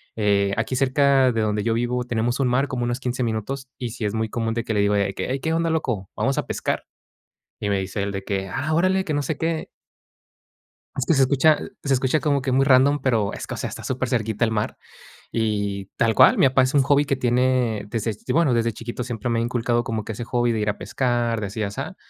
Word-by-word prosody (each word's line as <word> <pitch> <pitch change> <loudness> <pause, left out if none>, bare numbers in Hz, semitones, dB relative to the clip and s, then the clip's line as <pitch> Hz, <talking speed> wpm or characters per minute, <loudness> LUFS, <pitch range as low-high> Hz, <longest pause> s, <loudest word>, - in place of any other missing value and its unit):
eh, 100 -2 +2
aquí 115 +4 -1
cerca 135 -1 +3
de 115 - 0
donde 105 -1 0
yo 115 +1 +1
vivo 120 +2 -1
tenemos 120 +2 -1
un 135 - +2
mar 130 +3 +1
como 120 -2 -2
unos 120 +2 -2
15 125 0 -2
minutos 120 +4 -3
y 125 -2 -4
sí 110 -2 -4
es 105 - -1
muy 110 0 -1
común 115 0 -2
de 115 - -2
que 110 - -2
le 105 - +1
digo 100 0 +2
de 100 -1 +1
que: - - -4
"Hey, 135 +2 -1
¿qué 160 - -1
onda 165 0 +1
loco, 120 - -2
vamos 135 0 0
a - - -2
pescar?", - - -2 0.8
y 105 - -2
me 100 - +1
dice 95 +1 -3
él 100 - -2
de 95 0 -5
que: 95 -2 -2
"Ah, 155 +3 -1
órale, 185 +3 +2
que 155 - -2
no 145 - 0
sé 145 +2 -3
qué" 160 -1 -1 1.3
es 135 - -1
que - - +3
se 135 - +4
escucha 140 +3 +4 0.3
se 135 - +2
escucha 130 +4 +1
como 145 -3 +1
que 130 0 -2
muy 135 +1 +4
random, 140 +2 +4
pero 110 -6 +1
es - - -6
que, - - -7
o - - -6
sea, - - -3
está - - -8
supercerquita 120 -4 -1
el - - -1
mar 110 -1 -2 0.6
y 100 -3 -1
tal 115 -1 +2
cual. - - +7
Mi - - +6
papá 130 0 +3
es 130 +3 0
un 140 - +5
hobby 145 +1 +3
que 140 - 0
tiene 125 -3 +1
desde 110 0 -1 0.2
bueno, 160 -5 +3
desde 115 -1 +1
chiquito 120 +3 -5
siempre 120 -1 -4
me 115 -1 +1
ha - - +1
inculcado 120 0 0
como 110 -2 -2
que 110 - -6
ese 115 +3 -6
hobby 120 0 +1
de 110 - -1
ir 105 - 0
a 105 - -2
pescar, 120 +2 -1
de 105 - -3
así, 105 +3 -4
asá. 135 - -5
120 Hz, 250 wpm, -23 LUFS, 110-135 Hz, 1.3 s, cual